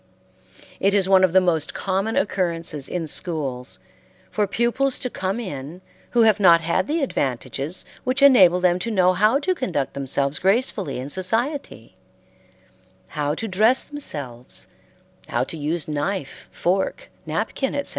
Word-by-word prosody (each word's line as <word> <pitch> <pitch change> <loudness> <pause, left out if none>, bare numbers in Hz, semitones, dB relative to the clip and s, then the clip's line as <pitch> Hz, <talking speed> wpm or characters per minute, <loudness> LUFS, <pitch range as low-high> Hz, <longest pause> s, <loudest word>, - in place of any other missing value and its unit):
It 200 +1 +2
is 195 -2 +3
one 190 -1 +5
of 185 - +4
the 190 - +6
most 170 -4 0
common 195 +3 -1
occurrences 165 -7 -1
in 175 -2 -2
schools 145 -6 -3 0.5
for 210 -1 0
pupils 240 +6 0
to 250 - -3
come 190 +4 -2
in 160 - -7 0.4
who 235 - +7
have 220 -1 +4
not 170 -4 +6
had 170 +4 0
the 310 0 0
advantages 140 - -3 0.2
which 260 +2 0
enable 190 -11 +7
them 180 0 +2
to 195 - -3
know 185 -4 +3
how 215 +8 +3
to 365 +6 0
conduct 175 - -2
themselves 140 +1 -1
gracefully 195 - 0
in 130 +3 -5
society; 230 - -2 1.1
how 150 -1 -2
to 225 - -4
dress 215 +6 +3
themselves; 140 - -5 0.6
how - - 0
to - - -6
use 155 +1 -2
knife, 150 +1 -4
fork, 190 +2 -1 0.2
napkin, 270 - -2
etc. 285 - -2
185 Hz, 145 wpm, -22 LUFS, 155-225 Hz, 1.1 s, who